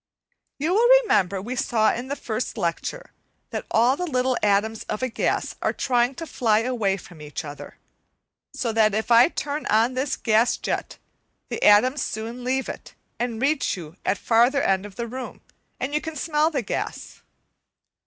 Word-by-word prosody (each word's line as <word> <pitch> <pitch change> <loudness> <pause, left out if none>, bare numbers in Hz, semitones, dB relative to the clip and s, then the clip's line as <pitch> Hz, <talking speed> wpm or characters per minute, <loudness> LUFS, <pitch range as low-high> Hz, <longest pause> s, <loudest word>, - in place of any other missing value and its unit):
You 315 +5 0
will 455 +4 +4 0.2
remember 195 - +1
we 235 +7 -5
saw 220 -3 +2
in 245 +2 -5
the 280 - -3
first - - -4
lecture, - - -3 0.4
that - - -4
all 240 +4 +3
the 360 +4 -3
little 255 -1 +1
atoms 210 +2 +1
of 215 - -4
a 255 - 0
gas - - -1
are - - 0
trying 245 0 +1
to 330 - -6
fly 225 -8 +1
away 225 -6 0
from 175 -4 -13
each 150 +1 -6
other, 145 0 -9 0.7
so 265 -4 -2
that 215 -2 +3
if 220 +2 -2
I 235 +1 +8
turn 295 -2 -4
on 225 +4 +3
this 260 +2 -1
gas 225 +1 +2
jet - - -3 0.5
the - - -4
atoms 255 +7 +5
soon 230 +3 -4
leave 260 +1 -1
it, - - -8 0.2
and 235 -2 -2
reach 280 -4 +1
you 165 -2 -9
at 195 - +1
the - - -22
farther 245 +5 +3
end 195 +1 +1
of 195 - -15
the 235 - -3
room, 255 +2 -7 0.4
and 275 +2 -3
you 300 - +1
can 320 -1 -6
smell 305 +1 +1
the 275 -6 -2
gas. - - -5
240 Hz, 185 wpm, -24 LUFS, 215-270 Hz, 0.7 s, I